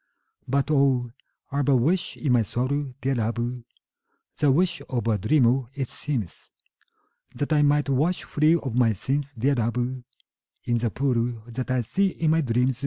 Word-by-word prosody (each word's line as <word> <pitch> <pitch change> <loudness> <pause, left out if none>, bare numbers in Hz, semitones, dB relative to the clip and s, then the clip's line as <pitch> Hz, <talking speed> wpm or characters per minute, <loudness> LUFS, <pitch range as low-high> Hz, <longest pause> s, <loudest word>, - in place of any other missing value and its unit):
But, 140 +2 0
oh, 135 -4 +2 0.4
I 140 +1 0
've 140 - 0
a 135 - +5
wish 160 +9 +1
in 145 - -1
my 120 -1 +4
soul, 130 +4 -2
dear 135 +1 0
love, 120 +1 -2 0.8
(The 145 -2 +4
wish 175 +6 +1
of 120 -3 -2
a 110 -2 +1
dreamer, 130 +3 +3
it 135 -3 -3
seems,) 125 - -4 1.0
That 145 +2 -1
I 150 - +4
might 145 0 +3
wash 150 +7 +1
free 155 +2 +3
of 135 -8 -3
my 120 -3 +3
sins, 135 +7 -2
dear 135 +5 +2
love, 125 +1 -1 0.6
In 120 -1 0
the 115 0 0
pool 120 -2 -1
that 125 +2 -5
I 130 -1 +1
see 195 - +1
in 165 -4 0
my 165 0 +3
dreams. 125 -1 0
130 Hz, 175 wpm, -25 LUFS, 120-145 Hz, 1.0 s, a